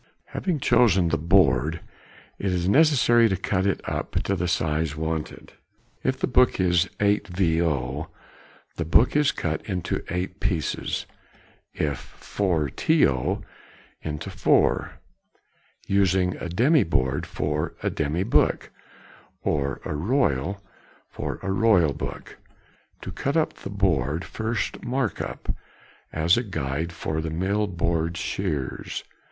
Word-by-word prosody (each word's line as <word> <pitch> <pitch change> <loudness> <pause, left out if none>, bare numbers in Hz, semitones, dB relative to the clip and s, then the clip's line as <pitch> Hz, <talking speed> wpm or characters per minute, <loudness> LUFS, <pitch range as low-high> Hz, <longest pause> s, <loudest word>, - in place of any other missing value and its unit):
] - - -45
Having 170 -7 -1
chosen 95 -11 +4
the - - +1
board, 80 -3 +3 0.6
it 95 - 0
is 90 -1 0
necessary 120 -3 +5
to 95 - 0
cut 95 +1 0
it 100 - 0
up - - -3
to 100 - 0
the 90 -1 -1
size 80 -2 0
wanted. 80 0 -4 0.5
If 130 0 +1
the - - 0
book 125 -3 +3
is 90 0 +3
8vo., 85 -8 +1 0.7
the 85 - -1
board 105 - +4
is 150 0 +4
cut 80 -1 -3
into 90 -3 -2
eight 90 +3 -3
pieces; 90 -7 -1 0.7
if 70 -3 -3
4to., 80 - +1 0.6
into 75 -1 -5
four; - - +2 0.9
using 95 -2 +2
a 85 - -5
demy 130 - +4
board 70 -3 0
for 75 0 -2
a - - +1
demy 75 +5 -1
book, 110 - +2 0.7
or 70 -3 -1
a - - -2
royal 100 - 0 0.5
for - - -4
a 95 - -1
royal 95 -7 +4
book. - - -7 0.7
To - - -5
cut 140 +4 -1
up 160 - +1
the - - -9
board, 85 -6 0
first 110 0 -3
mark 125 -2 -1
up, - - -4 0.6
as 80 +4 +3
a 120 - +1
guide 80 - -3
for 80 -1 -3
the 80 - -3
mill 95 +6 0
board 85 -2 -1
shears. 70 -5 -3
90 Hz, 130 wpm, -25 LUFS, 80-100 Hz, 0.9 s, necessary